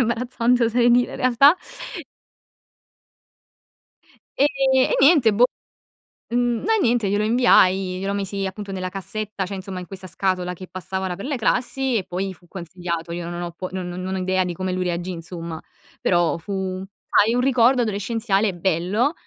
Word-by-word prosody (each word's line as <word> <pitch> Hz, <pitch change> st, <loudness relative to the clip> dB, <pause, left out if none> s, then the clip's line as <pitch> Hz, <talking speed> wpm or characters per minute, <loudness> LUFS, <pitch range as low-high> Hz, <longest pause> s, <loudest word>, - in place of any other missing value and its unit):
imbarazzante, 240 Hz, 0 st, +1 dB
oserei 240 Hz, +1 st, +3 dB
dire, 245 Hz, +1 st, +3 dB
in -, -, -6 dB
realtà. 260 Hz, +6 st, +5 dB, 2.8 s
E 285 Hz, -, +6 dB, 0.3 s
e 260 Hz, 0 st, +3 dB
niente, 275 Hz, -5 st, +6 dB
boh, 240 Hz, +4 st, +5 dB, 0.9 s
n 240 Hz, -1 st, +1 dB
no, 445 Hz, -, +2 dB
niente 235 Hz, -5 st, +2 dB
glielo 205 Hz, +2 st, +1 dB
inviai, 190 Hz, -6 st, +4 dB
glielo 195 Hz, +1 st, -2 dB
misi, 200 Hz, 0 st, -3 dB
appunto, 195 Hz, +1 st, -6 dB
nella 185 Hz, -1 st, -3 dB
cassetta, 195 Hz, +1 st, -4 dB
cioè, 195 Hz, +1 st, -5 dB
insomma, 190 Hz, 0 st, -6 dB
in 180 Hz, -, -7 dB
questa 190 Hz, 0 st, -9 dB
scatola, 180 Hz, 0 st, -1 dB
che 185 Hz, +1 st, -9 dB
passava 190 Hz, +1 st, -4 dB
là 180 Hz, -, -3 dB
per 200 Hz, -, -7 dB
le 285 Hz, -1 st, -1 dB
classi 250 Hz, +2 st, 0 dB
e 195 Hz, -, -1 dB
poi 190 Hz, +2 st, -4 dB
fu 175 Hz, 0 st, -24 dB
consigliato. 170 Hz, -1 st, -5 dB
Io 170 Hz, 0 st, -4 dB
non 175 Hz, 0 st, -5 dB
ho 175 Hz, -1 st, -5 dB
po 185 Hz, +2 st, -6 dB
non 185 Hz, -1 st, -4 dB
non 185 Hz, +2 st, -4 dB
ho -, -, -2 dB
idea 185 Hz, 0 st, +1 dB
di 180 Hz, -, -3 dB
come 185 Hz, +2 st, -3 dB
lui 185 Hz, 0 st, -1 dB
reagì, 175 Hz, +1 st, -2 dB
insomma, 165 Hz, -1 st, -7 dB, 0.4 s
però 175 Hz, -2 st, +2 dB
fu, 190 Hz, +1 st, -4 dB, 0.3 s
sai 220 Hz, +3 st, +4 dB
un 245 Hz, -, +2 dB
ricordo 250 Hz, -1 st, +4 dB
adolescenziale 215 Hz, -1 st, 0 dB
bello, 185 Hz, -, +1 dB
195 Hz, 170 wpm, -22 LUFS, 185-235 Hz, 2.8 s, E